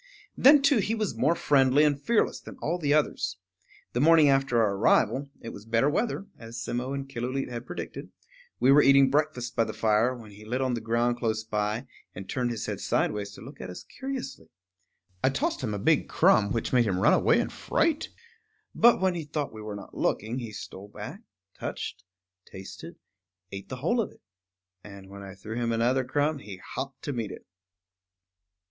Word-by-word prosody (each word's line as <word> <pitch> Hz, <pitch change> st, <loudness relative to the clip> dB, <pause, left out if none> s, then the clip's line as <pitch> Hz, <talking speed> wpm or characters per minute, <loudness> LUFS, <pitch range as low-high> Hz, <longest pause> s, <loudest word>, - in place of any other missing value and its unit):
Then, 280 Hz, +1 st, +7 dB
too, 280 Hz, -4 st, +4 dB
he 215 Hz, +3 st, 0 dB
was 215 Hz, -2 st, -2 dB
more 165 Hz, -, +2 dB
friendly 140 Hz, -2 st, +4 dB
and 145 Hz, -2 st, +2 dB
fearless 230 Hz, +5 st, +1 dB
than -, -, -11 dB
all 170 Hz, +3 st, -2 dB
the 145 Hz, -4 st, 0 dB
others. 150 Hz, 0 st, +1 dB, 0.6 s
The 120 Hz, -, 0 dB
morning 160 Hz, -1 st, +6 dB
after 135 Hz, -3 st, +2 dB
our 105 Hz, -3 st, +3 dB
arrival 135 Hz, +6 st, +2 dB
(it 115 Hz, -, -7 dB
was 100 Hz, -, -10 dB
better 115 Hz, +6 st, +2 dB
weather, 210 Hz, +3 st, -1 dB
as 115 Hz, 0 st, -9 dB
Simmo 125 Hz, +3 st, -3 dB
and 135 Hz, 0 st, -4 dB
Killooleet 130 Hz, +1 st, -3 dB
had 120 Hz, 0 st, -6 dB
predicted) -, -, -6 dB, 0.5 s
we 130 Hz, -, +5 dB
were 145 Hz, +2 st, +7 dB
eating 135 Hz, -1 st, +6 dB
breakfast 130 Hz, -4 st, 0 dB
by 115 Hz, -, +3 dB
the -, -, -5 dB
fire, 110 Hz, +3 st, +2 dB
when 110 Hz, -4 st, -12 dB
he 105 Hz, +1 st, -13 dB
lit 120 Hz, +4 st, -2 dB
on 130 Hz, -1 st, 0 dB
the 115 Hz, -, -2 dB
ground 120 Hz, +1 st, +1 dB
close 110 Hz, -2 st, -1 dB
by, 105 Hz, +1 st, -2 dB, 0.3 s
and 95 Hz, 0 st, -8 dB
turned 125 Hz, +4 st, -1 dB
his 115 Hz, -3 st, -4 dB
head -, -, -4 dB
sidewise 105 Hz, -1 st, 0 dB
to -, -, -12 dB
look 135 Hz, +7 st, -11 dB
at -, -, -6 dB
us 90 Hz, -, -8 dB
curiously. 265 Hz, -, -6 dB, 0.8 s
I 130 Hz, -, +5 dB
tossed 135 Hz, -, -1 dB
him 110 Hz, -5 st, -2 dB
a -, -, -2 dB
big 100 Hz, -, +2 dB
crumb, 100 Hz, -2 st, +4 dB
which 115 Hz, -, -2 dB
made 120 Hz, -3 st, +4 dB
him 95 Hz, -3 st, 0 dB
run 95 Hz, -, +4 dB
away -, -, +4 dB
in -, -, -1 dB
fright; 315 Hz, -2 st, 0 dB, 0.6 s
but 235 Hz, +1 st, +5 dB
when 190 Hz, -1 st, +2 dB
he 170 Hz, -2 st, -4 dB
thought 145 Hz, -2 st, -4 dB
we 110 Hz, -, -8 dB
were 105 Hz, -1 st, -6 dB
not 100 Hz, -, -10 dB
looking 115 Hz, +5 st, -1 dB
he 115 Hz, -3 st, -6 dB
stole 100 Hz, -1 st, -9 dB
back, -, -, -9 dB, 0.3 s
touched, -, -, -6 dB, 0.5 s
tasted, 95 Hz, +1 st, -9 dB, 0.6 s
ate 100 Hz, 0 st, -8 dB
the 130 Hz, -, -4 dB
whole 170 Hz, -, +1 dB
of 210 Hz, -, -4 dB
it. -, -, -22 dB, 0.6 s
And 100 Hz, -2 st, -12 dB
when 100 Hz, 0 st, -9 dB
I 95 Hz, 0 st, -9 dB
threw 110 Hz, +4 st, -7 dB
him 120 Hz, -1 st, 0 dB
another 120 Hz, +3 st, +2 dB
crumb, 145 Hz, +3 st, 0 dB
he 100 Hz, -6 st, -9 dB
hopped 135 Hz, +8 st, -7 dB
to 145 Hz, -, -3 dB
meet 115 Hz, -4 st, -3 dB
it. -, -, -10 dB
125 Hz, 200 wpm, -27 LUFS, 110-145 Hz, 0.8 s, Then